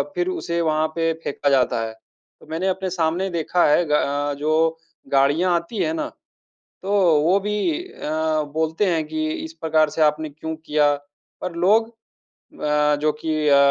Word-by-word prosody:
फिर 360 0 0
उसे 175 - -2
वहाँ 155 -1 +1
पे 165 -1 +1
फेंका 140 0 -1
जाता 125 -4 +2
है। 110 - -6
तो 110 - -26
मैंने 165 +4 -2
अपने 190 0 -1
सामने 175 +2 0
देखा 170 +1 +1
है 150 +4 +4
ग 150 - -5
अ, 145 0 +1
जो 160 +2 +1 0.4
गाड़ियाँ 145 +7 +3
आती 170 +6 -3
हैं 315 - -1
ना, 315 -1 -2 0.8
तो 195 - -3 0.3
वो 180 +6 +3
भी 210 +1 -2 0.3
अ, 155 - -2
बोलते 160 +5 0
हैं 160 -2 +1
कि, 315 - -2 0.2
"इस 320 - -9
प्रकार 155 -1 +3
से 160 - -3
आपने 155 0 +2
क्यों 160 +2 -6
किया?" 150 -2 +2 0.5
पर 180 -2 -4
लोग 215 +6 +3 0.4
अ, 150 - 0
जो 155 0 +2
कि 155 -2 0
अ, 140 - +6
160 Hz, 170 wpm, -22 LUFS, 150-185 Hz, 0.8 s, अ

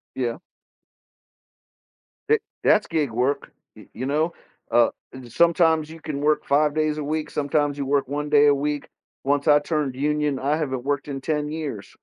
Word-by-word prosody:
Yeah. 125 +2 -2 1.9
Eh 450 0 +5 0.2
that's 215 0 +4
gig 155 -6 -1
work, 130 +5 -1 0.2
y - - -14
you 130 +3 -4
know, 155 +4 +1 0.4
uh, 120 -1 +5 0.4
sometimes 160 +2 +3
you 165 0 -11
can 145 -3 -4
work 150 +1 +1
5 145 +1 +3
days 155 -1 0
a 150 - -3
week, 155 +1 -2
sometimes 145 0 0
you 140 - -1
work 140 -2 +1
1 150 +1 -3
day 145 0 +6
a 145 - +6
week. 145 +1 -2 0.4
Once 145 +1 +1
I 145 -1 +6
turned 145 -4 -2
union, 150 0 0
I 145 +3 0
haven't 130 -5 -3
worked 145 0 -1
in 135 -1 -4
10 150 +1 -2
years, 145 -10 -5
145 Hz, 170 wpm, -23 LUFS, 140-155 Hz, 1.9 s, day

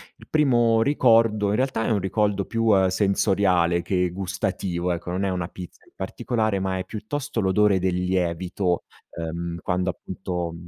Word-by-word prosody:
Il - - -17
primo 120 -7 +3
ricordo, 115 -6 +3
in 105 - +1
realtà, 130 -3 0
è - - 0
un 105 - +2
ricordo 100 +1 0
più 115 -1 +1 0.2
sensoriale 95 -3 +2
che 90 0 0
gustativo, 90 -1 -2
ecco. 85 +1 -5
Non 95 +2 -1
è - - 0
una 90 -2 -3
pizza 90 -2 -11
in - - -24
particolare, 110 +1 -2
ma 95 0 -1
è 95 - -4
piuttosto 120 +3 -4
l'odore 100 +1 +3
del 90 -1 0
lievito, 90 0 -1 0.3
ehm, 85 +1 -5
quando, 90 +1 -1
appunto 90 -2 -4
95 Hz, 155 wpm, -24 LUFS, 90-110 Hz, 0.3 s, primo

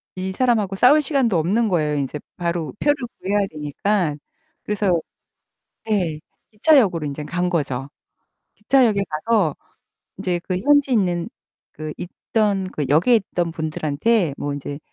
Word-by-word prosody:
이 190 0 -3
사람하고 215 -4 +1
싸울 260 +9 +6
시간도 265 - +1
없는 205 +8 +1
거예요, 155 -5 +1
인제 140 +1 -2 0.2
바로 170 -2 -2
표를 290 0 +3 0.2
구해야 200 +1 +1
되니깐. 155 +2 -1 0.4
그래서 200 -5 +1 0.9
네 185 -8 0 0.3
기차역으로 210 - +3
인젠 145 +1 -5
간 180 +2 -1
거죠. 135 -5 -2 0.7
기차역에 215 -2 +3
가서 160 0 +1 0.6
인제 175 -1 -1
그 180 - 0
현지에 285 +4 +3
있는 175 -5 +1 0.4
그 155 -1 -6
있던 200 +2 -1
그 150 - -2
역에 165 - +5
있던 175 -5 -2
분들한테 155 +3 0
뭐 145 - -3
인제 140 0 -5
180 Hz, 280 characters per minute, -21 LUFS, 155-215 Hz, 0.9 s, 싸울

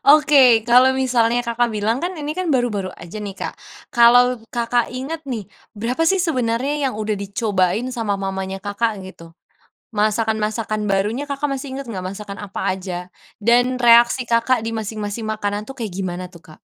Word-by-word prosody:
Oke, 285 -6 +6
kalau 250 +2 +6
misalnya 245 -3 +2
Kakak 235 -1 0
bilang 215 +2 0
kan 355 +2 -1
ini 300 +1 -4
kan 365 -4 0
baru-baru 210 -8 0
aja 170 +4 -10
nih, 205 -2 -5
Kak. - - -6 0.3
Kalau 245 +1 +5 0.2
Kakak 240 0 0
ingat 285 +5 -5
nih 230 -8 -5 0.2
berapa 235 +8 -1
sih 385 +3 +3
sebenernya 275 -2 0
yang 255 - -6
udah 215 0 -2
dicobain 200 +2 0
sama 225 -6 -2
mamanya 190 0 -4
Kakak 205 +1 -2
gitu? 165 -3 -12 0.6
Masakan-masakan 215 0 0
barunya 210 +9 0
Kakak 280 +1 -2
masih 265 0 -5
inget 275 -1 -6
nggak 190 -5 -5
masakan 205 -1 -8
apa 200 -1 -6
aja, 180 -1 -6 0.2
dan 245 +3 +3
reaksi 240 +1 +5
Kakak 230 0 +1
di 225 - -3
masing-masing 215 0 -4
makanan 210 -1 -3
itu - - -5
kayak 225 -6 -5
gimana 185 -1 -4
tuh, 170 - -14
Kak? - - -24
230 Hz, 165 wpm, -20 LUFS, 205-255 Hz, 0.6 s, Oke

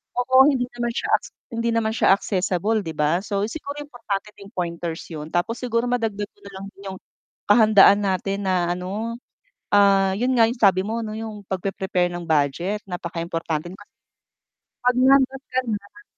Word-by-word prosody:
Oo, 260 +2 +5
hindi 260 -4 +2
naman 240 -1 -3
siya - - -3
acs - - -3 0.2
hindi 230 0 -1
naman 225 -1 0
siya - - +4
accessible 195 +2 0
'di 165 - -5
ba, 150 +3 +1
so 200 -1 -2
siguro 285 +3 -6
importante 230 -7 -5
din 200 0 -13
pointers 170 -3 -4
yun 155 -1 -6
tapos 175 +6 0
siguro 240 -1 -1
madagdag 225 -4 -1
ko - - -45
nalang 195 -1 -9 0.2
yung 190 -1 -6 0.5
kahandaan 205 -2 +7
natin 195 +1 -1
na 180 -2 +1
ano, 200 +6 -4 0.6
ah, 195 -1 +5
yun 250 +5 0
nga 230 - +6
yung 240 +1 -5
sabi 190 -3 +5
mo 225 +2 -2
ano 215 - -5
yung 220 -2 -7
pag-pe-prepare 190 -1 -1
ng 175 0 -5
budget 160 +6 0
napakaimportante 170 -3 -4
kasi 205 +2 -15 0.9
'pag 250 0 +3
nandun 265 +1 +4
ka 255 - +2
na 215 - -6
200 Hz, 165 wpm, -23 LUFS, 180-230 Hz, 0.9 s, kahandaan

